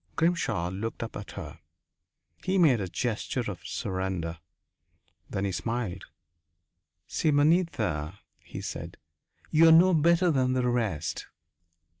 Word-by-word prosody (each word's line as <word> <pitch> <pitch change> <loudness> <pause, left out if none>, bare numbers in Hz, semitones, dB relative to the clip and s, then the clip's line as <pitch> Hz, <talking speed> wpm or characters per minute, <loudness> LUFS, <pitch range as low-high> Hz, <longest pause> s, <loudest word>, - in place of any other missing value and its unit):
Grimshaw 140 - +1
looked 110 +5 -4
up 115 - -7
at 105 - -7
her. - - -8 0.8
He 190 +1 +1
made 145 - +4
a 95 - -2
gesture 120 +5 -2
of 90 - -9
surrender. 95 -3 -3 0.9
Then 95 - -2
he 100 - -1
smiled. 110 +2 -3 1.0
"Simonetta," 145 - +1 0.2
he - - -9
said, - - -6 0.5
"you 165 +1 +6
are - - +8
no 180 +3 +7
better 170 +2 +4
than 130 -3 +2
the 125 -1 +1
rest." 105 -11 -1
120 Hz, 120 wpm, -28 LUFS, -, 1.0 s, are